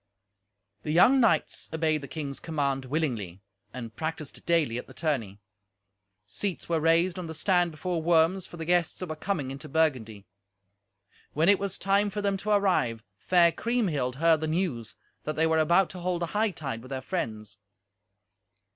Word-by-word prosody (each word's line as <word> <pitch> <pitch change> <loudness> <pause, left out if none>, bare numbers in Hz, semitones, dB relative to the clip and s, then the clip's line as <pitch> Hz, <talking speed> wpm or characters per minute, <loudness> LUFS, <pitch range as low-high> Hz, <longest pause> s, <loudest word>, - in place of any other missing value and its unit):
The 150 - -4
young 240 - +6
knights 220 -10 +1
obeyed 155 -1 0
the 140 - -7
king's 140 -3 -5
command 140 -4 -2
willingly, 120 - -3 0.3
and 115 -3 -8
practised 160 -2 -5
daily 155 -9 +2
at - - -9
the - - -14
tourney. 130 - -2 0.9
Seats 190 - -4
were 165 -1 +1
raised 170 +3 +2
on 175 - -5
the 160 - -6
stand 175 +1 +2
before 165 +2 -3
Worms 170 +3 +2
for 175 - -11
the 165 - -5
guests 175 -1 +1
that 185 - -6
were 155 - -3
coming 155 -5 -3
into 145 +3 -8
Burgundy. 125 -10 0 1.1
When 160 +5 +3
it 205 - +5
was 200 -2 -2
time 200 +2 +2
for 205 +1 -4
them 200 -1 +1
to 205 +2 -5
arrive, 185 - +2 0.2
fair 175 -2 +4
Kriemhild 165 - -1
heard 160 +2 +3
the 155 - -1
news, 155 - -2 0.3
that 155 - -3
they 160 - +2
were 160 0 +2
about 170 +3 +3
to 185 - -8
hold 175 -1 -1
a 170 - -5
hightide 160 - -1
with 130 - -12
their 135 -1 -4
friends. 110 - -4
160 Hz, 175 wpm, -27 LUFS, 135-180 Hz, 1.1 s, young